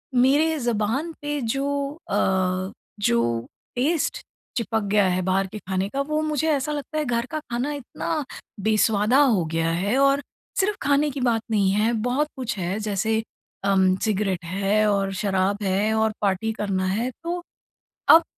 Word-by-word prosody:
मेरे 290 Hz, +6 st, +4 dB
ज़ुबान 240 Hz, +7 st, 0 dB
पे 295 Hz, 0 st, -2 dB
जो 280 Hz, +4 st, -1 dB
अ, 185 Hz, 0 st, +1 dB, 0.3 s
जो 115 Hz, -, +1 dB, 0.3 s
टेस्ट 295 Hz, +6 st, 0 dB, 0.4 s
चिपक 225 Hz, -1 st, 0 dB
गया 205 Hz, -2 st, +4 dB
है 180 Hz, +1 st, +1 dB
बाहर 190 Hz, +1 st, +2 dB
के 215 Hz, -, -6 dB
खाने 190 Hz, +1 st, -2 dB
का, 275 Hz, +4 st, -1 dB
वो 305 Hz, +2 st, -1 dB
मुझे 310 Hz, 0 st, 0 dB
ऐसा 295 Hz, +1 st, 0 dB
लगता 295 Hz, +1 st, -4 dB
है, 305 Hz, -, 0 dB
घर 235 Hz, 0 st, 0 dB
का 310 Hz, -, -1 dB
खाना 250 Hz, +5 st, -1 dB
इतना 290 Hz, +3 st, -3 dB, 0.4 s
बेस्वादा 220 Hz, +3 st, +3 dB
हो 225 Hz, -, +4 dB
गया 165 Hz, 0 st, +1 dB
है 200 Hz, +9 st, 0 dB
और 275 Hz, +1 st, +4 dB, 0.4 s
सिर्फ़ 405 Hz, +2 st, +1 dB
खाने 285 Hz, +1 st, +3 dB
की 265 Hz, -, -5 dB
बात 230 Hz, -3 st, +2 dB
नहीं 200 Hz, -3 st, +3 dB
है, 215 Hz, +4 st, +2 dB
बहुत 250 Hz, +7 st, 0 dB
कुछ 245 Hz, -5 st, -3 dB
है। 185 Hz, +3 st, -2 dB
जैसे 215 Hz, +1 st, 0 dB, 0.4 s
अम, 190 Hz, -1 st, +4 dB
सिगरेट 195 Hz, -4 st, 0 dB
है 200 Hz, +4 st, +1 dB
और 195 Hz, -1 st, 0 dB
शराब 200 Hz, +1 st, +1 dB
है, 200 Hz, +3 st, +1 dB
और 220 Hz, 0 st, +2 dB
पार्टी 200 Hz, +2 st, +1 dB
करना 190 Hz, -2 st, 0 dB
है। 230 Hz, +7 st, 0 dB
तो 350 Hz, +1 st, -2 dB, 0.7 s
अब 330 Hz, -, +9 dB
220 Hz, 165 wpm, -24 LUFS, 195-280 Hz, 0.7 s, अब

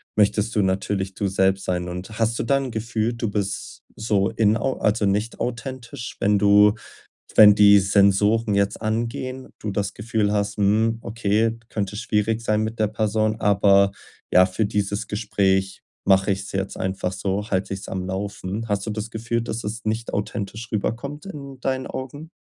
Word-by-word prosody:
möchtest 105 Hz, +1 st, +2 dB
du 105 Hz, -, +3 dB
natürlich 95 Hz, 0 st, -1 dB
du 100 Hz, -, -1 dB
selbst 95 Hz, 0 st, +1 dB
sein. 90 Hz, -1 st, -2 dB
Und 90 Hz, +5 st, -7 dB
hast 115 Hz, 0 st, 0 dB
du -, -, 0 dB
da 140 Hz, -, +2 dB
'n 135 Hz, -2 st, -1 dB
Gefühl, 110 Hz, 0 st, -1 dB
du 115 Hz, -2 st, -3 dB
bist 100 Hz, -1 st, -4 dB, 0.2 s
so 105 Hz, -3 st, +1 dB
inau 115 Hz, +4 st, +1 dB
also 105 Hz, 0 st, +1 dB
nicht 105 Hz, +3 st, -1 dB
authentisch, 120 Hz, +1 st, -5 dB
wenn 105 Hz, 0 st, +3 dB
du 105 Hz, +1 st, +6 dB, 0.6 s
wenn 105 Hz, -1 st, +9 dB
die 100 Hz, -1 st, +7 dB
Sensoren 100 Hz, +2 st, +3 dB
jetzt 100 Hz, +1 st, 0 dB
angehen, 115 Hz, +4 st, -3 dB
du 105 Hz, -, -4 dB
das 100 Hz, 0 st, -2 dB
Gefühl 105 Hz, -1 st, -1 dB
hast: 105 Hz, 0 st, -1 dB
„Hm, 110 Hz, +3 st, +2 dB
okay, 110 Hz, +1 st, 0 dB
könnte 105 Hz, -1 st, -3 dB
schwierig 110 Hz, 0 st, 0 dB
sein 110 Hz, -2 st, +1 dB
mit 110 Hz, +1 st, -3 dB
der 110 Hz, -, +3 dB
Person, 110 Hz, 0 st, 0 dB
aber 100 Hz, -1 st, +4 dB, 0.4 s
ja, 90 Hz, +1 st, +7 dB
für 95 Hz, +4 st, -1 dB
dieses 100 Hz, 0 st, -2 dB
Gespräch 95 Hz, -2 st, 0 dB, 0.2 s
mache 95 Hz, +1 st, +4 dB
ich's 100 Hz, 0 st, -3 dB
jetzt 95 Hz, 0 st, -3 dB
einfach 95 Hz, -1 st, -2 dB
so, 100 Hz, +3 st, -3 dB
halte 95 Hz, -1 st, -1 dB
ich's 95 Hz, -, -7 dB
am 95 Hz, -1 st, -4 dB
Laufen.“ 100 Hz, +3 st, -4 dB
Hast 100 Hz, -2 st, -1 dB
du -, -, -4 dB
das 110 Hz, +1 st, -5 dB
Gefühl, 115 Hz, +1 st, -2 dB
dass 115 Hz, 0 st, -4 dB
es 110 Hz, +2 st, -5 dB
nicht 110 Hz, +2 st, -2 dB
authentisch 105 Hz, +2 st, -4 dB
rüberkommt 140 Hz, -, -3 dB
in 140 Hz, -8 st, -9 dB
deinen 130 Hz, 0 st, -2 dB
Augen? 145 Hz, +4 st, -7 dB
105 Hz, 170 wpm, -23 LUFS, 100-115 Hz, 0.6 s, wenn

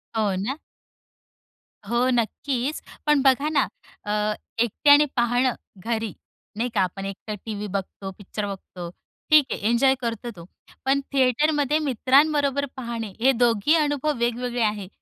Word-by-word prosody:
हो, 210 Hz, -3 st, +1 dB
ना. 210 Hz, +10 st, -2 dB, 1.3 s
हो 240 Hz, +2 st, +2 dB
नक्कीच. 250 Hz, +4 st, -1 dB, 0.2 s
पण 300 Hz, -2 st, +4 dB
बघा 275 Hz, +2 st, +3 dB
ना 290 Hz, -3 st, +2 dB, 0.4 s
अ, 210 Hz, 0 st, 0 dB, 0.3 s
एकट्याने 285 Hz, +6 st, +5 dB
पाहणं 245 Hz, +1 st, +2 dB, 0.2 s
घरी, 225 Hz, +2 st, -3 dB, 0.4 s
नाही 240 Hz, +3 st, 0 dB
का? 200 Hz, -, +2 dB
आपण 190 Hz, +2 st, -2 dB
एकटं 195 Hz, +2 st, -6 dB
टीव्ही 210 Hz, -1 st, -4 dB
बघतो, 195 Hz, 0 st, -5 dB
पिक्चर 205 Hz, +1 st, -5 dB
बघतो, 185 Hz, -3 st, -7 dB, 0.4 s
ठीक 305 Hz, -3 st, +7 dB
आहे -, -, -2 dB
एन्जॉय 265 Hz, +3 st, +4 dB
करतो 235 Hz, 0 st, -3 dB
तो. 170 Hz, -1 st, -11 dB, 0.4 s
पण 270 Hz, +1 st, +3 dB
थिएटरमध्ये 290 Hz, +3 st, +2 dB
मित्रांबरोबर 280 Hz, +1 st, +2 dB
पाहणे 235 Hz, -3 st, -4 dB
हे 265 Hz, +4 st, +5 dB
दोन्ही 240 Hz, +4 st, +3 dB
अनुभव 295 Hz, -1 st, +1 dB
वेगवेगळे 240 Hz, +1 st, -1 dB
आहे. 210 Hz, -3 st, -1 dB
240 Hz, 130 wpm, -24 LUFS, 210-275 Hz, 1.3 s, ठीक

